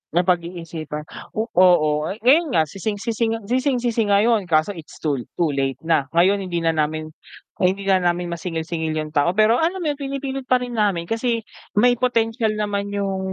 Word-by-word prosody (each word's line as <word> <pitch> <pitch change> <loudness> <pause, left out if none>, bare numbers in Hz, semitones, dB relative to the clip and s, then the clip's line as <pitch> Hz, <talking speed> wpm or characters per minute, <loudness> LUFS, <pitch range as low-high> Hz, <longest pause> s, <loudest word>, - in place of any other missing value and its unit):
Napag-iisipan 170 -4 -1 0.3
oo, 175 -8 +3 0.2
ngayon 290 - +4
nga 160 - +5
sising-sisi 210 +7 -2
nga 225 - -5
sising-sisi 245 -1 0
ngayon, 205 0 +3
kaso 160 +4 +2
it's 165 -4 -12
too 145 -4 0 0.2
too 165 -3 +1
late 135 -1 -1
na. 160 -4 +1
Ngayon 190 +4 +4
hindi 170 -2 -2
na 165 - +3
namin 155 0 -2 0.5
hindi 190 +2 +1
na 190 -1 +3
namin 175 0 0
masingil-singil 160 -1 -3
'yung 155 -1 -3
tao, 160 +4 +1
pero 215 +3 +4
alam 350 +3 0
mo - - -1
'yun 290 - -7
pinipilit 270 -1 -4
pa 250 -1 +2
rin 245 - -6
namin 195 -5 +1
kasi 230 +3 -1 0.3
may 245 +3 +4
potensyal 225 -3 +1
naman 205 -1 -2
'yung 200 -1 -2
195 Hz, 165 wpm, -22 LUFS, 165-230 Hz, 0.5 s, nga